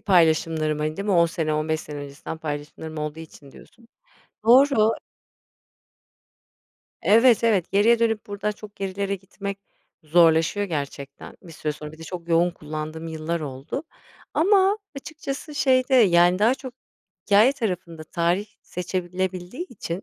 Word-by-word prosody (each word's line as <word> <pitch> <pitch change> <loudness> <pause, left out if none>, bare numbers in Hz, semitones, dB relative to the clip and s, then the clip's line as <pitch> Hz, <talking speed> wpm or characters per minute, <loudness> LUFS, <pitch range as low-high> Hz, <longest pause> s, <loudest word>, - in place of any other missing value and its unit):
paylaşımlarım, 160 -4 +2
hani, 155 +1 -2
değil 200 +1 -4
mi? 200 - +2
10 170 -1 +5
sene, 160 -2 -2
15 155 +1 -1
sene 150 -1 -8
öncesinden 145 +3 -7
paylaşımlarım 155 +1 -6
olduğu 150 +1 -4
için 150 -3 -13
diyorsun. 230 0 -18 0.6
Doğru. 240 -2 +5 2.1
Evet, 230 +1 +5
evet. 200 -7 +2
Geriye 225 +4 +4
dönüp 225 -2 0
buradan 205 +1 -2
çok 210 0 -11
gerilere 200 0 -2
gitmek 200 +1 -7 0.4
zorlaşıyor 165 +4 +3
gerçekten 140 -3 -6
bir 170 -3 -12
süre 150 0 -3
sonra, 150 0 -9
bir 155 - -14
de - - -10
çok 170 +1 -7
yoğun 170 +1 +3
kullandığım 155 0 -6
yıllar 160 +1 -3
oldu 140 - -5 0.5
ama 390 +3 +4 0.2
açıkçası 300 0 -7
şeyde, 260 -1 +2
yani, 180 -5 +5
daha 230 +5 +4
çok 260 -2 -9 0.5
hikâye 215 +6 +5
tarafında 180 - -4
tarih 175 +5 0 0.2
seçilebildiği 185 - -4
için, 190 -4 -6
180 Hz, 135 wpm, -24 LUFS, 155-215 Hz, 2.1 s, 10